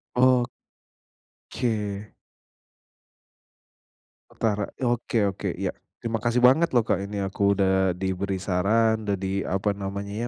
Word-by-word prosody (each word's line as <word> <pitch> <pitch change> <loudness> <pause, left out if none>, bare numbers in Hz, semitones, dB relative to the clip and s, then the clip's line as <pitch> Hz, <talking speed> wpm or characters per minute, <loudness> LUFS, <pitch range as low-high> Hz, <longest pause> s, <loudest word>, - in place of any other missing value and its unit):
Oh. 125 0 +4 1.1
Ke. 105 -4 -3 2.2
Utara. 105 -2 -1
Oke 120 -3 +1
oke 95 -1 -3
iya. - - -1 0.3
Terima 115 -1 -1
kasih 120 +2 +1
banget 135 +4 +5
loh 120 - +5
Kak 100 - 0
ini 100 0 -3
aku 100 +1 +1
udah 95 -2 +2
diberi 95 +1 -2
saran, 105 +4 +1
udah 100 - +1
di 95 0 -2
apa 95 +2 0
namanya 100 +3 -4
100 Hz, 115 wpm, -25 LUFS, 95-115 Hz, 2.2 s, banget